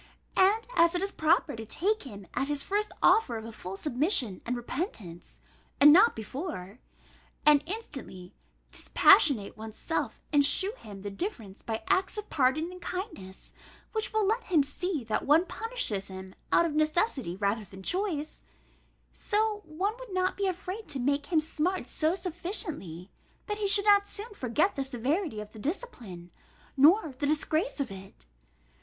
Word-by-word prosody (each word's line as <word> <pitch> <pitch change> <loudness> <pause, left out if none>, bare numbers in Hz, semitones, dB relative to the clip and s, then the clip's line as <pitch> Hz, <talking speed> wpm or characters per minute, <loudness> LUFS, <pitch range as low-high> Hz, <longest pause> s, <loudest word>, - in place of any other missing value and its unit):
And 410 +4 +4
as 335 +1 +4
it 355 - 0
is 395 - -2
proper 315 -3 +2
to 225 - -6
take 390 - 0
him 205 -7 -10
at 270 - -1
his 290 -1 -1
first 420 +1 -1
offer 255 - +4
of 220 - -7
a 230 - -7
full 195 -3 -7
submission 255 - +1
and 245 - 0
repentance 230 - -6 0.4
(and 295 +1 +9
not 400 +7 +6
before), 220 - -6 0.7
and 300 -1 +7
instantly 270 - -7 0.4
dispassionate 280 - +4
one's 220 0 -8
self, 325 - -3
and 290 -1 +6
shew 380 +8 +1
him 205 - -11
the 205 - -4
difference 215 - -5
by 225 +3 -4
acts 385 +1 +1
of 420 0 -6
pardon 300 +5 +1
and 365 0 -11
kindness 350 - -7 0.4
(which 440 -1 -1
will 435 -2 +1
let 445 +5 0
him 325 -6 +3
see 305 +1 -3
that 220 +3 -2
one 315 +5 +5
punishes 440 - -3
him 190 0 -9 0.2
out 340 - +5
of 325 - -2
necessity 305 - +1
rather 205 +2 0
than 190 0 -12
choice), 345 - -2 0.7
so 425 0 0
one 370 +7 -2
would - - -10
not 370 0 0
be 395 -1 0
afraid 380 +3 -4
to 295 -2 -3
make 280 +3 0
him 330 -3 +3
smart 325 +4 -1
so 315 +3 0
sufficiently, 340 - -5 0.3
that 420 -1 -4
he 410 - 0
should 400 +1 +4
not 405 -1 +5
soon 420 +2 -7
forget 300 - 0
the 275 - -1
severity 270 - -1
of 210 0 -9
the 220 - -10
discipline, 230 - -6 0.4
nor 310 +3 +5
the 290 - 0
disgrace 310 +6 0
of 265 -6 -2
it. 195 - -12
310 Hz, 165 wpm, -29 LUFS, -, 0.7 s, and